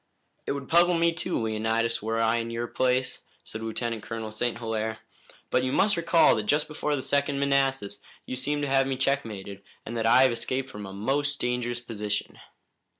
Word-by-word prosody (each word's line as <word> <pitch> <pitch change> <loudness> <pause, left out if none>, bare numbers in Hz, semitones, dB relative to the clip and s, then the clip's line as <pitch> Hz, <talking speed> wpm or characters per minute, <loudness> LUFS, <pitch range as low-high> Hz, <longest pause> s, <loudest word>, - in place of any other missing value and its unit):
"It - - 0
would 140 -1 -6
puzzle 175 +1 +5
me 170 0 +3
too, 165 - -2
Leonidas, 110 +1 0
were 115 +2 -1
I 115 +1 +3
in 115 0 -3
your 115 +1 -3
place," 130 +1 0 0.2
said 110 - -8
Lieutenant 115 0 -3
Colonel 110 +1 -5
St. 115 +2 -1
Hilaire; 110 -1 -2 0.5
"but - - +3
you 130 - 0
must 205 +8 +3
recall 170 0 +4
that 105 -1 -3
just 150 +4 +2
before 150 -1 -1
the 130 - -4
Second 140 0 +1
Manassas 135 -6 +1 0.3
you - - -4
seemed 145 +3 -1
to - - 0
have 135 0 +3
me 135 -1 -2
checkmated, 110 -8 -2 0.2
and 115 - -5
that 115 -1 0
I 130 +3 +7
have 130 - +5
escaped 130 +3 -2
from 105 -1 -7
a - - -8
most 140 +8 0
dangerous 120 0 -1
position." 105 -3 -4
120 Hz, 195 wpm, -27 LUFS, 110-140 Hz, 0.5 s, I